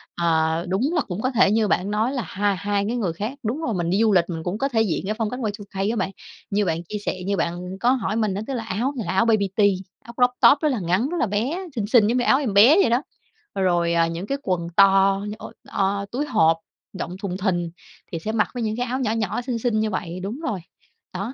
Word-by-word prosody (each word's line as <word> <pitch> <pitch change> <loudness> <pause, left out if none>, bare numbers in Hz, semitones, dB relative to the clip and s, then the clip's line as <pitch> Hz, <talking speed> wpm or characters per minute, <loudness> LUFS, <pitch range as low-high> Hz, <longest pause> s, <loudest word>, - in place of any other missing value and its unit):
à, 160 -1 +1
đúng 240 - 0
là 320 - +3
cũng 195 -2 -5
có 255 - 0
thể 205 -4 +4
như 220 -1 +2
bạn 195 +1 0
nói 220 +4 +1
là 260 -5 -2
hai 200 +1 0
hai 200 +1 -1
cái 240 - -1
người 185 -8 -1
khác 210 +8 -4
đúng 245 +9 -2
rồi, 235 -9 -1
mình 170 -2 -1
đi 195 +4 +1
du 220 - +4
lịch 175 -2 +4
mình 165 -1 -4
cũng 185 +4 -2
có 275 +3 0
thể 225 -4 +2
diện 190 -4 -1
cái 215 - -1
phong 220 -2 -1
cách 250 - -5 0.2
Y2K 200 0 -4
á 235 - -2
bạn. 195 - -1 0.4
Như 205 +1 +1
bạn 165 -1 -1
chia 210 +5 -5
sẻ 185 - -2
như 200 0 0
bạn 180 +2 -3
có 245 +1 +3
hỏi 220 -5 -1
mình 215 -3 0
á, 200 - -3
tức 270 - -3
là 235 -3 -3
áo 225 +7 -2
thì 230 - -2
là 180 - -2
áo 190 +5 +3
baby 215 -4 +2
tea, 205 -2 +5 0.4
áo 235 - -11
croptop 250 +3 +4
rất 305 - +2
là 250 -6 -1
ngắn, 185 +9 0
rất 350 - -3
là - - +3
bé, 225 - -1 0.2
xinh 205 -3 -2
xinh 220 -2 +5
giống 240 +2 +1
như 245 - +1
áo 265 - +4
em 245 -9 -2
bé 230 +10 +7
vậy - - +3
đó, 240 +3 +2 0.6
rồi, 175 -2 +2
à, 165 0 +3
những 170 +4 -5
cái 275 - -1
quần 180 -5 -1 0.6
như 210 - -5
ôi, - - -10 0.2
o, 200 +1 0
túi 280 +5 -1
hộp 165 - +3 0.4
rộng 175 - -4
thùng 185 -2 -3
thình, 175 -4 -1 0.4
thì 165 - -3
sẽ 215 +6 -3
mặc 220 -2 +1
với 245 -2 -3
những 215 0 -2
cái 245 - -1
áo 255 +2 -2
nhỏ 245 -5 0
nhỏ 220 0 -1
xinh 245 -1 -3
xinh 225 -2 0
như 220 - 0
vậy 185 -3 -4
đúng 220 +8 -4
rồi. 215 - -3 0.5
Đó, 195 +7 -4
210 Hz, 270 wpm, -23 LUFS, 185-240 Hz, 0.6 s, bé